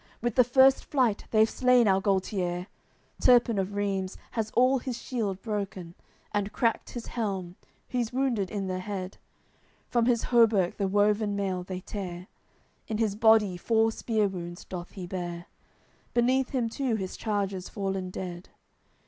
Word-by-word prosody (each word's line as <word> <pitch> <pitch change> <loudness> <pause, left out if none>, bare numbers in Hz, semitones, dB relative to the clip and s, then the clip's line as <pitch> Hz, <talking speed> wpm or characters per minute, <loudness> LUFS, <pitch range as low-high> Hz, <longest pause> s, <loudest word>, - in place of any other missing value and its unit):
With 240 0 -1
the 250 - +6
first 265 +2 +5
flight 250 -7 +1
they've 220 0 +4
slain 250 -1 +4
our 190 -1 +3
Gualtier; 185 -2 0 0.6
Turpin 240 -4 +5
of 195 +1 -2
Reims 195 -2 -2
has 220 -2 -2
all 255 +2 +4
his 245 -1 -5
shield 210 -7 -3
broken, 195 -5 -4 0.4
And 205 0 -1
cracked 230 -3 0
his 240 -2 -6
helm; 190 -6 -3 0.3
he's 240 -3 -2
wounded 245 -7 0
in 200 -2 -3
the 185 -1 -2
head, 190 -1 -5 0.7
From 235 -1 +2
his 235 -2 +2
hauberk 225 -7 +3
the 200 - 0
woven 205 +1 +2
mail 190 -2 -1
they 185 0 -6
tear, 180 -3 -6 0.6
In 215 - -2
his 220 -3 +1
body 215 -4 +4
four 225 +4 +2
spear 220 -2 0
wounds 175 -2 -7
doth 180 -1 -7
he 185 -3 -6
bear; 175 -1 -5 0.7
Beneath 255 +2 +2
him 250 -4 0
too 245 0 -1
his 190 -3 -4
charger's 200 -4 -2
fallen 195 -2 -3
dead. 180 -1 -7
205 Hz, 155 wpm, -28 LUFS, 190-235 Hz, 0.7 s, the